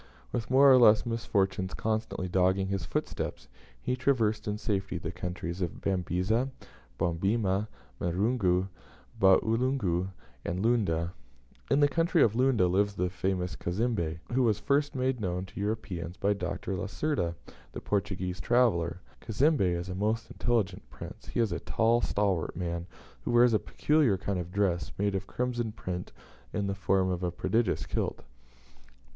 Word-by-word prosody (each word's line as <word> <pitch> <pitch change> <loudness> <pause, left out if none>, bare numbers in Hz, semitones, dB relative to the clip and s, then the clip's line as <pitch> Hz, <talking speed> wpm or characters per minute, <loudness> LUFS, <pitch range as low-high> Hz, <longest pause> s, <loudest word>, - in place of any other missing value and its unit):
With 120 -1 -3
more 135 +2 +7
or 130 - +8
less 110 -1 +6
misfortunes 95 -5 -1
constantly 110 -3 -2
dogging 95 +1 +2
his 95 -4 -2
footsteps, - - -3 0.3
he 125 - -1
traversed 115 -6 +1
in 105 0 -1
safety 100 -3 -2
the - - -4
countries 90 0 -5
of 85 -3 -3
the - - -1
Babisa, 95 +7 0 0.5
Bobemba, 95 +4 +1 0.3
Barungu, 95 0 +1 0.5
Ba 95 -1 +7
ulungu, 110 -7 0 0.4
and 90 +5 -2
Lunda. 85 -8 +1 0.6
In 140 +2 +3
the 145 - +7
country 165 +3 +3
of 110 - +3
Lunda 125 -6 +3
lives 100 +3 +1
the 90 -1 -1
famous 90 -1 -2
Cazembe, 90 -4 -1 0.2
who 130 - +3
was 110 -4 +3
first 140 +4 +1
made 130 -2 0
known 90 -1 -2
to 95 - -10
Europeans 95 -5 -3
by 100 +1 +2
Dr. 95 0 -3
Lacerda, 95 - -1 0.4
the - - -5
Portuguese 95 -3 -2
traveller. 90 -9 +2 0.2
Cazembe 135 - +2
is 85 +1 -4
a 95 - -4
most 110 +4 -1
intelligent 105 -6 0
prince; - - -10
he - - -3
is 115 -5 +2
a 85 - -2
tall, 115 +1 +2
stalwart 100 -8 0
man, 85 0 -3 0.3
who - - -5
wears 120 0 +5
a 110 - +4
peculiar 150 -10 +2
kind 95 0 -2
of 90 0 -5
dress, 90 -6 0
made 100 0 +1
of 95 0 -3
crimson 120 -2 -2
print, 90 -4 -5 0.4
in 100 - -1
the 100 - -1
form 95 -1 +1
of 90 -1 -2
a 90 - 0
prodigious 110 +4 0
kilt. - - -2
100 Hz, 155 wpm, -29 LUFS, 90-115 Hz, 0.6 s, or